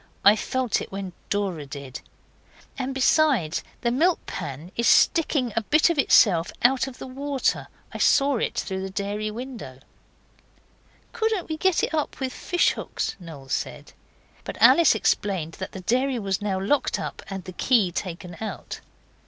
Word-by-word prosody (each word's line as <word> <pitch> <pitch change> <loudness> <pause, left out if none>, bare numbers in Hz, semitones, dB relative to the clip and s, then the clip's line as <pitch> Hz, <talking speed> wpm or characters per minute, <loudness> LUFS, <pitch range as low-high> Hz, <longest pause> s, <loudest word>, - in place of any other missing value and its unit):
I 205 +2 +8
felt 255 +1 -1
it - - -8
when 195 -2 -5 0.2
Dora 190 -8 -2
did. 140 -2 -8 0.7
And 265 0 -3
besides, 265 - +2 0.2
the 235 - +1
milk 330 +8 +2
pan 145 +6 -6
is 235 0 +1
sticking 285 -8 +3
a 225 - +2
bit 305 - +3
of 320 - -2
itself 175 -10 +4
out 260 +2 +4
of 260 -1 -9
the - - -8
water. 275 +1 -2 0.3
I - - -6
saw 280 -2 +4
it - - -2
through 190 -1 -2
the 190 - -4
dairy 205 +2 -3
window.' 230 - -7 1.4
'Couldn't 445 -6 -1
we 315 - -1
get 375 +1 +2
it - - -1
up 305 -2 -2
with 260 -2 -3
fish 350 -1 +1
hooks?' - - -4
Noel 155 -7 -11
said. - - -4 0.5
But - - -7
Alice 335 -8 +6
explained 190 -6 0
that - - -5
the 190 - -8
dairy 255 +6 +1
was 195 -3 -2
now 195 -2 -1
locked 240 +10 +1
up - - -5
and 195 -2 -5
the 185 - -9
key 210 -2 +2
taken 175 -1 -6
out. 220 - -6
220 Hz, 165 wpm, -25 LUFS, 190-270 Hz, 1.4 s, I